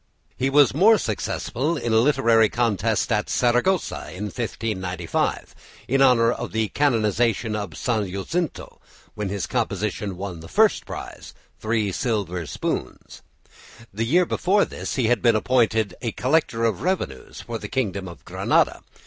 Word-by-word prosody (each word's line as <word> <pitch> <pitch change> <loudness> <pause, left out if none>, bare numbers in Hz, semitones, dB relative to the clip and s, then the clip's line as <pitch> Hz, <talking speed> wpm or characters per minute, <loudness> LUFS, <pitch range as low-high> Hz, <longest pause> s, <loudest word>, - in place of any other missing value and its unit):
He 130 - 0
was 140 -3 +5
more 210 +9 +6
successful 135 - -2
in 120 -5 -2
a 110 - +5
literary 115 -4 +4
contest 115 -1 0
at 105 -1 0
Saragossa 125 +10 +1
in 95 - -6
1595 105 -4 -3 0.3
in 135 +2 +2
honour 120 -3 +5
of - - -5
the 110 -1 0
canonisation 115 -4 +1
of 100 -7 -5
St. 110 -6 -1
Jacinto, 160 - -4 0.3
when 105 -2 -4
his 100 -1 -2
composition 105 -2 -2
won 95 -3 -6
the 80 - -10
first - - +2
prize, - - -8 0.2
three 110 -2 0
silver 90 - -2
spoons. 65 - -5 0.7
The 110 +3 -1
year 175 +7 +4
before 195 +4 +2
this - - -5
he 130 - +1
had 120 0 +2
been 115 -2 +4
appointed 110 -2 +2
a 120 -2 -2
collector 130 -4 +1
of 115 - 0
revenues 160 - -3
for 115 -1 -5
the - - -7
kingdom 100 -7 -2
of 85 - -12
Granada. - - +1
115 Hz, 150 wpm, -23 LUFS, 105-130 Hz, 0.7 s, more